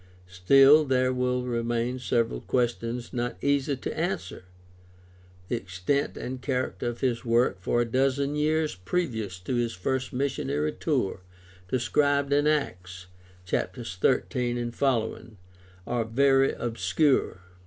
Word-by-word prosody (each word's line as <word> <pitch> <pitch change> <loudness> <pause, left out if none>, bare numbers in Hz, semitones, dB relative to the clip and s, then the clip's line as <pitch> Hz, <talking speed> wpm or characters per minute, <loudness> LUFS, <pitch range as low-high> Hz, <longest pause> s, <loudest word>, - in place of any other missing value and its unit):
Still 135 +12 +6
there 130 -2 +1
will 125 0 0
remain 120 +1 -1
several 115 - 0
questions 120 -1 -2
not 120 0 -2
easy 140 0 +1
to - - -5
answer. 160 - -3 1.0
The 120 - -1
extent 95 +8 -2
and 130 0 -5
character 130 -2 -2
of 120 0 -4
his 125 -2 0
work 115 -5 +1
for 120 +5 +1
a - - +1
dozen 135 +4 0
years 155 +1 +1
previous 110 - -3
to 90 - -4
his 120 -1 0
first 130 +8 -2
missionary 75 - -1
tour 95 -1 -1 0.5
described 140 +4 +1
in 145 +1 +3
Acts, 90 -12 -2 0.4
chaps. 115 +2 -3
13 120 +4 0
f., 120 - -15 1.0
are 120 -2 -1
very 135 +3 +3
obscure. 120 - 0
125 Hz, 120 wpm, -27 LUFS, 115-135 Hz, 1.0 s, Still